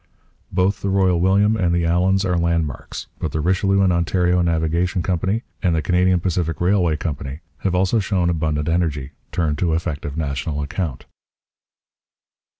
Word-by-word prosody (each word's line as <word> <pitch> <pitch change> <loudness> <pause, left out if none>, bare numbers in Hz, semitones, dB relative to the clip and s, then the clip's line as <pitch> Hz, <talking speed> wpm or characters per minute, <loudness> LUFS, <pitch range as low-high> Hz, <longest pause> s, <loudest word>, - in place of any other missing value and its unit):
Both 100 +2 +1
the 100 - -1
Royal 95 -3 +2
William 100 +4 +3
and 90 -5 +1
the 85 - +1
Allans 95 +3 +2
are 90 -1 +1
landmarks. 85 -5 -2
But - - -3
the 80 - -1
Richelieu 95 +4 +2
and 95 -2 +3
Ontario 90 +1 +2
Navigation 85 +2 0
Company 95 +6 -1 0.2
and 90 -3 +2
the 80 - 0
Canadian 90 0 +3
Pacific 85 -2 -1
Railway 90 -3 +2
Company 70 -1 -5 0.2
have 95 -2 -1
also 95 +5 +2
shown 95 -3 0
abundant 80 -3 -1
energy; 80 -5 -1 0.2
turned 80 -4 -1
to 85 -3 +1
effective 80 -3 -4
national 75 0 -2
account. 70 -3 -4
85 Hz, 150 wpm, -21 LUFS, 80-95 Hz, 0.2 s, William